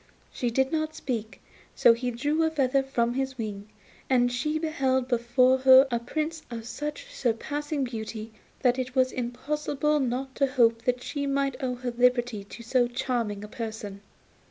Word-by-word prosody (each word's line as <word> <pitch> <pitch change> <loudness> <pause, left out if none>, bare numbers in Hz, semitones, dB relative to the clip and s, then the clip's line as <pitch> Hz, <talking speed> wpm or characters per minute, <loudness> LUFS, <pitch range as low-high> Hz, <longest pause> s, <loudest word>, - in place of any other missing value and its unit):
She 245 - -1
did 265 +3 +1
not 310 -1 -1
speak, 225 -4 -4 0.3
so 235 - +6
he 245 +2 -2
drew 290 +7 0
a 320 - +3
feather 275 -3 +2
from 240 -3 0
his 265 0 -2
wing, 210 -2 -5 0.4
and 245 -2 +3
she 300 +6 -1
beheld 270 -5 0
before 250 +1 +3
her 260 +1 +8
a 235 - +1
Prince 310 +6 -3
of 230 -2 -6
such 300 - -6
surpassing 290 - -2
beauty 220 -2 -5 0.3
that 250 0 +3
it 255 0 -4
was 255 -1 +3
impossible 295 +4 -1
not 260 0 -2
to 275 - +3
hope 235 -3 +2
that 250 0 0
she 285 -2 -3
might 275 -2 -1
owe 250 -1 -1
her 245 0 -4
liberty 240 -3 +2
to 235 +3 -10
so 245 +1 +2
charming 240 -5 -2
a - - -7
person. 215 -3 -6
255 Hz, 170 wpm, -27 LUFS, 235-275 Hz, 0.4 s, her